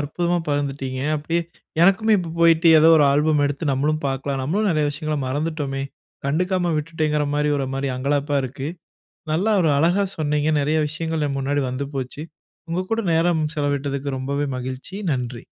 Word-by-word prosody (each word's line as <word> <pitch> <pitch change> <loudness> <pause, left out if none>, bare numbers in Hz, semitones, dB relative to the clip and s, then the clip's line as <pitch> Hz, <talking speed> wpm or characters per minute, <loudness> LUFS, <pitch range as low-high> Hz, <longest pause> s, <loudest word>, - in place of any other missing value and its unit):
அற்புதமா 175 +4 -1
பகிர்ந்துட்டீங்க. 135 -2 -2 0.2
அப்டியே 165 +3 -1 0.4
எனக்குமே 215 +4 +4
இப்போ 170 -2 -4
போயிட்டு 165 0 +5
ஏதோ 160 - +6
ஒரு 150 - +5
ஆல்பம் 150 +1 +2
எடுத்து 145 +1 -1
நம்மளும் 150 +3 0
பார்க்கலாம், 135 0 -2
நம்மளும் 200 +9 0
நிறைய 155 -2 +1
விஷயங்கள 155 +1 -3
மறந்துட்டோமே. 145 -1 -2 0.4
கண்டுக்காம 175 +3 0
விட்டுட்டேங்கிற 150 -1 -1
மாரி 150 0 +1
ஒரு 135 - -1
மாரி 135 +1 -2
அங்கலாப்பா 145 +2 0
இருக்கு. 135 +3 -5 0.6
நல்லா 190 +8 +1
ஒரு 160 - +3
அழகா 175 +6 +3
சொன்னீங்க. 150 0 +1
நிறைய 150 +3 +1
விஷயங்கள் 160 0 -2
என் 140 - -3
முன்னாடி 140 +1 0
வந்து 135 +2 -3
போச்சு. 135 +3 -4 0.5
உங்க 175 +2 0
கூட 225 - +1
நேரம் 165 0 +2
செலவிட்டதுக்கு 140 -1 -2
ரொம்பவே 140 +2 -2
மகிழ்ச்சி. 130 +8 -6 0.2
நன்றி 125 -2 -4
150 Hz, 155 wpm, -22 LUFS, 140-165 Hz, 0.6 s, ஏதோ